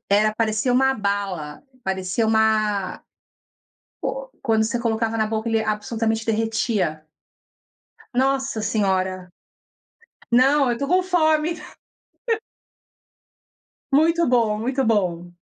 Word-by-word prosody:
era 215 +1 +3
parecia 220 +2 0
uma 265 +2 +4
bala, 200 - -3 0.2
parecia 190 +3 -1
uma 215 -3 +1 1.0
o - - -3
quando 220 -3 +2
você 230 +2 -1
colocava 225 -1 -1
na 220 -1 +1
boca 220 +1 -2
ele 225 -1 +1
absolutamente 220 +1 -2
derretia. 220 -8 -1 1.1
Nossa 265 -2 0
senhora, 185 -4 -1 1.0
não, 270 +4 +4
eu 240 - +2
estou 280 +4 -3
com 365 +3 +3
fome. 320 -3 +2 2.4
Muito 330 +3 +3
bom, 230 -4 +2
muito 260 +4 -1
bom. 180 -6 0
220 Hz, 100 wpm, -22 LUFS, 205-255 Hz, 2.4 s, uma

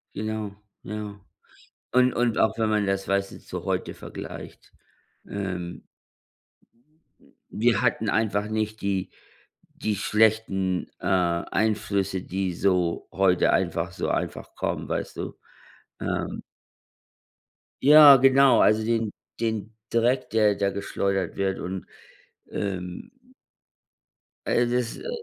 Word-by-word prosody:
Genau, 110 -1 -4 0.3
jau. 105 0 -6 0.7
Und 125 0 +4
und 120 -2 +1
auch 110 - +2
wenn 110 -1 +2
man 105 -1 +2
das, 95 0 -1
weißt 100 0 0
du, - - -11
zu - - -7
heute - - -2
vergleicht. - - -9 0.6
Ähm 90 -5 -5 1.6
wir 115 0 +2
hatten 115 -3 +1
einfach 105 -1 0
nicht 110 0 -2
die 100 -2 -1 0.6
die 105 -1 -2
schlechten, 105 -5 +1
äh, - - -7
Einflüsse, 95 +2 0
die 95 -1 -2
so 90 -2 0
heute 95 -2 +3
einfach - - 0
so - - -3
einfach - - -3
kommen, - - -3
weißt - - -3
du? - - -5 0.6
Ähm. - - -3 1.4
Ja, 150 0 +10
genau, 135 0 +6
also 110 +1 +4
den 115 -2 0 0.3
den 110 -1 -2 0.2
Dreck, 120 +3 +1
der 105 -2 +3
der 100 0 0
geschleudert 100 -2 -2
wird 95 -1 -1
und, 95 +1 -5 0.7
ähm 90 - -4 1.4
äh, 120 - +2
das, 120 -1 -1
äh 475 -1 -6
105 Hz, 115 wpm, -25 LUFS, 95-110 Hz, 1.6 s, Ja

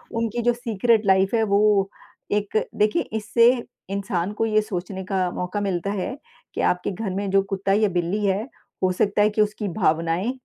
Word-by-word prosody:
उनकी 230 +1 -1
जो 240 - +3
secret 230 -2 +1
life 190 +3 +3
है 225 - +3
वो 200 -1 +3 0.4
एक 210 +1 0 0.2
देखिए 210 0 +2 0.2
इससे 230 +2 +4 0.4
इंसान 195 -1 -2
को 225 +1 0
ये 215 -1 +3
सोचने 190 -2 -5
का 185 -1 0
मौका 185 +3 -3
मिलता 195 -1 -1
है 205 +5 -3 0.4
कि - - -2
आपके 180 +2 +1
घर 200 +1 -4
में 200 +1 -2
जो 195 - +4
कुत्ता 195 0 -2
या 210 0 +3
बिल्ली 180 +4 -1
है, 200 +2 +1 0.4
हो 185 - +3
सकता 200 +2 +1
है 210 - +5
कि 215 0 +1
उसकी 210 0 -1
भावनाएँ 170 +3 0
200 Hz, 185 wpm, -23 LUFS, 190-215 Hz, 0.4 s, है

